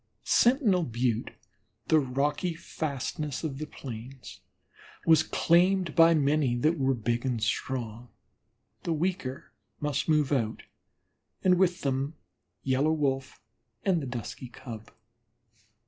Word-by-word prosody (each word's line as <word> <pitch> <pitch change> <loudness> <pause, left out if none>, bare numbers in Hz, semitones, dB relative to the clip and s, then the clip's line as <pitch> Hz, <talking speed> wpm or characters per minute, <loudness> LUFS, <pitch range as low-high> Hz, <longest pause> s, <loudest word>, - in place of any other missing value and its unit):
Sentinel 235 - +4
Butte, 120 -4 -1 0.6
the 160 - +6
rocky 145 +6 -1
fastness 150 -2 -4
of 140 -4 -3
the 155 - -4
plains, 120 - -9 0.7
was 160 -2 +6
claimed 175 +1 +2
by 165 0 +6
many 145 -3 +2
that 155 +6 +1
were 135 0 +2
big 120 +1 -1
and 125 -3 -1
strong; 120 0 -2 0.7
the 170 - -1
weaker 160 -5 -3 0.3
must 145 +1 -1
move 150 -3 +3
out, 115 -6 0 0.8
and 180 -1 +4
with 180 -1 +2
them 135 +2 -1 0.5
Yellow 135 +4 +2
Wolf 135 -3 -1 0.5
and 185 -4 +2
the 135 - -5
Dusky 125 +1 -6
Cub. 115 -2 -9
140 Hz, 115 wpm, -28 LUFS, 125-165 Hz, 0.8 s, the